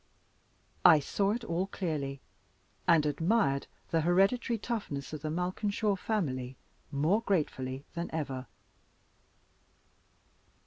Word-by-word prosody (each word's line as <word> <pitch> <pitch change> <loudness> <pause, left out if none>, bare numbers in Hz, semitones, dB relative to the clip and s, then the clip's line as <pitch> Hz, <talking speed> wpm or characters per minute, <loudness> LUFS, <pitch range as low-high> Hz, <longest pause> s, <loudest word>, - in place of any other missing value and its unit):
I 155 - +9
saw 195 +7 0
it 230 +3 -1
all 180 -1 -1
clearly, 145 -8 -3 0.7
and 165 -3 +5
admired 160 -1 +1 0.2
the 165 - +3
hereditary 195 +8 +3
toughness 195 - -4
of 155 - -5
the 155 - -3
Malkinshaw 200 +5 0
family 135 - -2 0.3
more 155 +10 +2
gratefully 140 - -1
than 170 +1 -3
ever. 135 -5 -3
165 Hz, 100 wpm, -31 LUFS, 140-200 Hz, 0.7 s, I